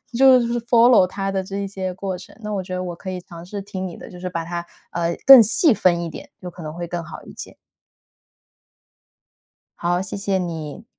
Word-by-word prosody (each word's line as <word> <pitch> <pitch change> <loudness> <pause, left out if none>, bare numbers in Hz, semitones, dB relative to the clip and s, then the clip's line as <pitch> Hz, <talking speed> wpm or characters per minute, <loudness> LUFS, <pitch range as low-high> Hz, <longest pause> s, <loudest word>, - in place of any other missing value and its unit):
就 260 0 +7
是 235 0 -1
follow 235 -4 +5
它 195 +1 -3
的 190 -1 -1
这 195 +1 -7
一 - - -3
些 190 -1 -4
过 190 -1 -4
程。 185 - -14
那 210 - -4
我 195 - -1
觉 185 0 -6
得 185 - -3
我 175 -1 -5
可 185 - -8
以 185 -1 -4
尝 170 -1 -12
试 200 +2 -7
听 190 -2 -5
你 170 - -9
的， - - -11
就 180 - -11
是 180 - -4
把 165 -2 -4
它， 170 0 -4 0.3
呃， 170 0 -1
更 270 -2 +11
细 240 - +4
分 175 -4 +2
一 170 - -3
点， - - -10
就 180 - -8
可 175 - -12
能 155 -1 -6
会 175 0 -5
更 170 0 -4
好 165 0 -10
一 - - -12
些。 - - -9 2.2
好， 175 +1 0
谢 190 +1 -6
谢 195 -1 0
你。 165 +2 -5
185 Hz, 270 characters per minute, -21 LUFS, 175-205 Hz, 2.2 s, 更